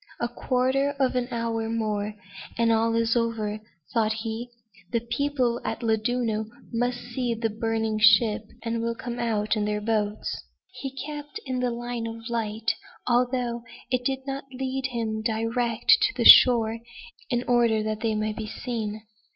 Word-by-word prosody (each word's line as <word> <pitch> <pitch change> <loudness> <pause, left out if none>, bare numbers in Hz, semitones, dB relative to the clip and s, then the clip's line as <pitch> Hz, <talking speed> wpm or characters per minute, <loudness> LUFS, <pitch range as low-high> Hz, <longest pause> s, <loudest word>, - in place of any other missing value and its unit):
"A 240 - 0
quarter 260 +3 0
of 260 -2 +2
an 250 -1 0
hour 230 -2 -2
more 215 -2 -2 0.4
and 230 0 +3
all 225 0 +2
is 230 0 +2
over," 225 -3 -1 0.3
thought 220 -1 +2
he. 225 +2 -4 0.4
"The 235 - +1
people 245 0 0
at 235 - -3
Llandudno 220 -1 0 0.3
must 245 +1 0
see 245 -1 -3
our 230 - +1
burning 225 0 -1
ship, 215 0 +5 0.2
and 230 0 -1
will 230 0 -1
come 240 0 -5
out 215 -2 0
in 210 -1 0
their 210 0 -1
boats." 210 -1 -1 0.3
He 275 - -5
kept 295 +7 -7
in 255 -1 -2
the 250 0 +1
line 240 -1 -4
of 230 +1 -7
light, 225 -1 -1 0.3
although 245 -1 +1 0.3
it 250 -1 +1
did 265 +1 -2
not 275 0 -4
lead 265 0 -2
him 225 -3 -2
direct 230 +1 +2
to - - +3
the - - 0
shore, 230 -2 +8 0.5
in 240 0 0
order 235 -3 +3
that 215 0 -2
they 220 -1 0
might 215 0 -2
be 220 - -4
seen. 215 -2 -4
230 Hz, 160 wpm, -26 LUFS, 220-245 Hz, 0.5 s, shore